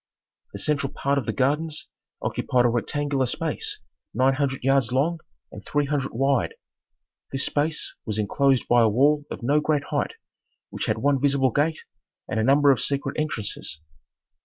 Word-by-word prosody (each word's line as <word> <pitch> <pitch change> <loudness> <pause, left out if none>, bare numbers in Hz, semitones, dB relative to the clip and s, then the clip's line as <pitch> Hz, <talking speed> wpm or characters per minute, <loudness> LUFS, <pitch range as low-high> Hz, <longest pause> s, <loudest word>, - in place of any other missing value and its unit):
The - - -5
central 140 +5 0
part 140 0 0
of 130 - -7
the - - +1
gardens 150 +4 -1 0.4
occupied 125 -1 +1
a - - +5
rectangular 135 +3 0
space - - -3 0.3
nine 130 +3 +4
hundred 135 -2 -1
yards 135 -3 +2
long 155 +6 +1 0.3
and - - -10
three 145 0 0
hundred 140 -2 -1
wide. 135 +2 +1 0.8
This 135 0 0
space 150 +2 -1
was 110 -2 -3
enclosed 130 +5 +2
by 120 0 +5
a 115 - +5
wall 145 +6 +3
of - - -7
no 145 +5 +3
great 150 -1 +1
height - - 0 0.6
which - - -4
had 110 - +1
one 140 +2 +1
visible 140 -2 +3
gate 150 +5 0 0.5
and 110 - -2
a - - +2
number 140 +3 +5
of 130 - +1
secret 140 0 -2
entrances. 110 - -3
135 Hz, 165 wpm, -25 LUFS, 125-145 Hz, 0.8 s, a